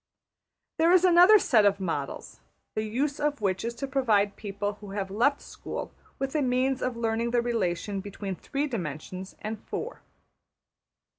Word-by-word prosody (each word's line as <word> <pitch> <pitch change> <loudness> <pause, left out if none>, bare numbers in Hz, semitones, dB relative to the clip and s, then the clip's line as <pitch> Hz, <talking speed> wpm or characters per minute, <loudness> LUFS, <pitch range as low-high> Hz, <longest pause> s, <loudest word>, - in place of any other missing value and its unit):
There 330 +2 +5
is 370 0 +6
another 360 +4 +8
set 235 - +4
of 200 -1 +3
models, 160 -7 -4 0.3
the 215 - -1
use 260 +7 -1
of 295 -2 0
which 190 -3 0
is 235 +1 -3
to 275 +4 -4
provide 220 -7 +2
people 205 0 -4
who 205 - -9
have 195 -1 -3
left 265 +8 +2
school - - -6 0.3
with 270 0 -3
a 305 - +1
means 255 0 +1
of 250 -2 -2
learning 230 0 0
the 240 0 +2
relation 205 -4 -1
between 195 -1 -5
three 280 +10 -2
dimensions 185 - -5
and 215 0 -4
four. - - -5
230 Hz, 160 wpm, -28 LUFS, 200-270 Hz, 0.3 s, another